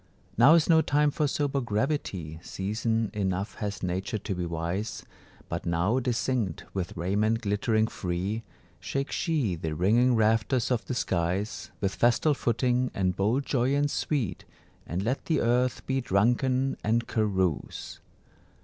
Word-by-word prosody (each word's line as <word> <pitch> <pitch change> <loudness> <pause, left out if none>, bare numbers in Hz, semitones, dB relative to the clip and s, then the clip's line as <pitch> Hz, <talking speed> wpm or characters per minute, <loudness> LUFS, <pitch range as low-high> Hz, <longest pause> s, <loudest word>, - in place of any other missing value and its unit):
Now 135 +8 +7
is 165 - +3
no 160 -1 +6
time 145 0 +2
for 150 +1 0
sober 140 -1 0
gravity, 105 - -2
Season 110 +4 -1
enough 100 -1 -1
has 100 -2 -4
Nature 95 +5 -2
to 100 - -4
be 90 -1 -3
wise; 85 +6 -3 0.4
But - - -4
now 85 +9 +2
distinct, 120 -6 -1
with 95 -3 -4
raiment 105 +6 +1
glittering 110 +1 +1
free, 95 +2 -3 0.4
Shake 135 0 -3
she 150 - 0
the 80 -2 -3
ringing 115 +9 +3
rafters 115 +3 +2
of 120 -3 +1
the 125 - -3
skies 95 0 -1
With 100 -1 0
festal 120 +6 +3
footing 125 0 +1
and 95 -2 +1
bold 115 +8 +1
joyance 140 +3 +1
sweet, 115 - -1 0.4
And 90 +4 -2
let 125 +6 -1
the 160 -3 +1
earth 125 +1 +1
be 135 0 0
drunken 125 +5 +1
and 115 +2 +1
carouse! 95 - -1
110 Hz, 140 wpm, -28 LUFS, 95-130 Hz, 0.4 s, Now